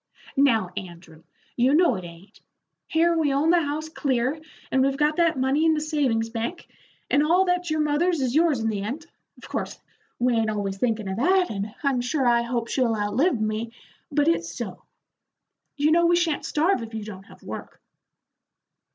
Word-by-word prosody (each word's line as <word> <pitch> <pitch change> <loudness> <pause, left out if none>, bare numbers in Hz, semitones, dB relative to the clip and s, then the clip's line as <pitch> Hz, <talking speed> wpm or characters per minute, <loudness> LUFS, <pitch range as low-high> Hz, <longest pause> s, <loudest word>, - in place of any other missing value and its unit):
"Now, 230 -10 +3
Andrew, 170 -3 -9 0.3
you 255 +4 +3
know 340 -4 +4
it 185 -4 -5
ain't. 170 +3 -13 0.5
Here 335 +1 +2
we 310 -3 +1
own 290 +4 +2
the 350 -1 +4
house 300 +1 -3
clear, 275 -1 -1 0.3
and 260 - +3
we've 270 +1 +1
got 300 +1 +1
that 335 -4 +2
money 265 +4 +1
in 320 -1 +4
the - - 0
savings 270 -8 0
bank, 235 +10 -4 0.4
and 285 - +4
all 350 +5 +3
that's 360 -1 0
your 310 0 +1
mother's 305 +3 +1
is 255 -3 0
yours 315 -3 +3
in 225 - 0
the 205 -2 -2
end. 265 +11 -5 0.3
Of - - -13
course - - -4 0.4
we 245 0 +2
ain't 225 -1 +1
always 200 -2 -3
thinkin' 225 -3 0
of 190 +1 -3
that, 365 +8 +2
and 205 +1 -5
I'm 270 -3 +1
sure 265 +2 -1
I 235 -1 +4
hope 235 -1 -2
she'll 240 -3 +1
outlive 220 - +1
me, 215 +2 -2 0.4
but 290 +1 +2
it's 335 - +1
so. - - -6 1.0
You 295 +2 +2
know 340 +1 +4
we 345 - +4
sha'n't 340 -3 0
starve 325 +1 +1
if 225 -1 -7
you 220 - -4
don't 195 -2 -9
have - - -17
work." - - -8
270 Hz, 190 wpm, -24 LUFS, 225-315 Hz, 1.0 s, know